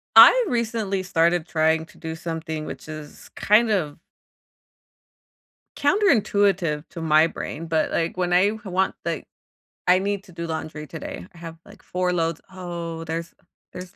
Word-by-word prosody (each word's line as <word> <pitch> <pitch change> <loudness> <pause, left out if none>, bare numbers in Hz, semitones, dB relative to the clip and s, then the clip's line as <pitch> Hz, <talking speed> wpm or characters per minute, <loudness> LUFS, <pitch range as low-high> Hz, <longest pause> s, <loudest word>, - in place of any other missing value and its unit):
I - - +9
recently 225 - -1
started 170 -2 +2
trying 160 0 +2
to - - -19
do 160 -1 -5
something 160 -1 -5
which - - -8
is 155 -1 -9
kind 220 +3 +4
of 165 -9 -1 1.8
counterintuitive 205 - +2
to 165 - -8
my 155 0 +5
brain. 165 0 -6
But, 160 -1 +1
like, 170 +2 -1
when 180 -1 0
I 185 +3 +5
h 220 0 -14
want, 190 0 0
like - - -3 0.6
I 180 +1 +6
need 200 0 -2
to 185 - -15
do 170 0 -5
laundry 155 -1 -5
today, 90 - -7
I - - -17
have, 165 -1 -9
like, - - -16
4 180 0 -1
loads. 165 -2 -1
Oh, 170 -3 -6
there's 165 +1 -5 0.4
there's 180 +1 -9
170 Hz, 155 wpm, -24 LUFS, 160-195 Hz, 1.8 s, I